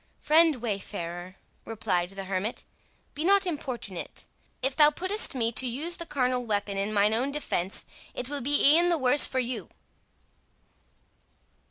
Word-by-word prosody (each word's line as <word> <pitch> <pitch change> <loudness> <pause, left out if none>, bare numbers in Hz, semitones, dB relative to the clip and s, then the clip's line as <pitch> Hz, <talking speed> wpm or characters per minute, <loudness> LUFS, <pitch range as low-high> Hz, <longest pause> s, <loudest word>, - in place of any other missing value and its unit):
"Friend 320 0 +4
wayfarer," 185 -6 -5 0.3
replied 180 -6 -1
the 195 0 -7
hermit, 190 +4 -3 0.5
"be 300 - -4
not 395 +2 +4
importunate; 255 - -5 0.4
if 265 0 +1
thou 300 -1 +7
puttest 370 +4 -2
me 230 -2 0
to 235 +3 +1
use 305 +9 -4
the 335 - -6
carnal 255 -2 0
weapon 205 -3 -1
in 200 +2 -1
mine 210 0 +3
own 250 +5 +1
defence, 200 -10 -3 0.3
it 250 - -4
will 285 +1 -3
be 285 +2 +5
e'en 345 +1 +4
the 340 - +2
worse 260 +1 +5
for 260 - -5
you." 240 -6 -2
250 Hz, 150 wpm, -27 LUFS, 205-295 Hz, 0.5 s, thou